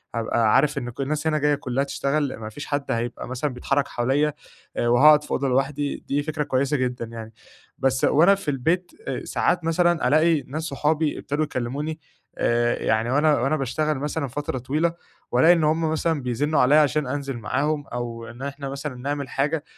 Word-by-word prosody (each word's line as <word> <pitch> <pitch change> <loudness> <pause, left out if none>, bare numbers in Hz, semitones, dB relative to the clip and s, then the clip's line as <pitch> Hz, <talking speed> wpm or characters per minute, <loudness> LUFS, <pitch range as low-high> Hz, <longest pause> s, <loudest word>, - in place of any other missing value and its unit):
هابقى 115 -1 +2
عارف 150 -1 +3
إن 125 -3 -3
كُ 120 - -7
الناس 150 +3 -1
هنا 155 -1 +2
جايّة 150 0 +2
كلّها 135 -1 -2
تشتغل 140 0 -1
ما 110 -1 -7
فيش 145 +7 -8
حَدّ 145 -1 -2
هيبقى 120 +1 -3
مثلًا 130 +3 -3
بيتحرّك 135 +3 0
حواليّا 140 +5 0 0.4
آآ، 120 - +1
وهاقعد 150 +5 +6
في - - -11
أوضة 135 0 0
لوحدي، 140 +2 0
دي 145 +1 0
فكرة 155 -1 -2
كويسة 140 +1 0
جدًا 125 -2 -2
يعني، 115 -1 -9 0.4
بس 130 0 0
وأنا 175 +7 +5
في 180 -6 -3
البيت 165 +7 0 0.2
آآ، - - -3
ساعات 175 - 0
مثلًا 170 -2 +2
ألاقي 155 +2 +3
ناس 155 +4 -4
صحابي 150 +1 0
ابتدوا 145 +2 -1
يكلّموني 145 +4 -3 0.4
آآ، 120 0 +1
يعني 110 +2 +1
وأنا، 150 0 +3
وأنا 135 +6 +1
باشتغل 150 +2 -1
مثلًا 150 0 -2
فترة 135 +1 -4
طويلة، 155 +7 0 0.4
وألاقي 130 +8 +6
إن 165 -2 +1
همُ 160 +1 +1
مثلًا 160 -2 0
بيزنّوا 140 +5 0
عليَّ 130 +4 +5
عشان 150 -2 +3
أنزل 140 -2 -3
معاهم 140 +6 -1
أو 115 -1 -5
إن 120 +2 -11
إحنا 140 0 -5
مثلًا 140 -1 -5
نعمل 140 +1 -4
حاجة 150 +4 -1
140 Hz, 185 wpm, -24 LUFS, 125-155 Hz, 0.4 s, وهاقعد